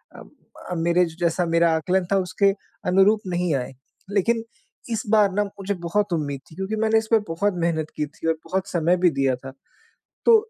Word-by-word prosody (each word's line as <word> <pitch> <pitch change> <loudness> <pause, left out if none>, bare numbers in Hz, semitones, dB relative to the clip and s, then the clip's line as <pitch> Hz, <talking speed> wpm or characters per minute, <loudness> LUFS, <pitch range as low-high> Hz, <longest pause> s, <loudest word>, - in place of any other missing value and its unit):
अम, - - -12 0.4
अ, - - -1
मेरे 170 +2 +3
जैसा 175 +1 +1
मेरा 165 0 +3
आंकलन 180 +3 0
था 195 - +4
उसके 190 +2 +2 0.4
अनुरूप 200 +3 +4
नहीं 175 -2 0
आएँ। 130 0 -3 0.4
लेकिन 225 +3 +1 0.5
इस 225 - 0
बार 210 -3 +5
ना 205 +1 +2
मुझे 200 0 -4
बहुत 200 +1 0
उम्मीद 145 -4 -2
थी - - -13
क्योंकि 195 +3 -3
मैंने 220 0 +3
इस 220 0 0
पे 225 - +7
बहुत 190 +5 0
मेहनत 160 -2 0
की 150 - 0
थी 155 +2 -7
और 165 - +4
बहुत 190 +1 -2
समय 175 +1 +2
भी 180 0 +4
दिया 135 -3 +1
था। 135 +1 -9 0.8
तो 465 -1 +8
180 Hz, 195 wpm, -23 LUFS, 165-200 Hz, 0.8 s, तो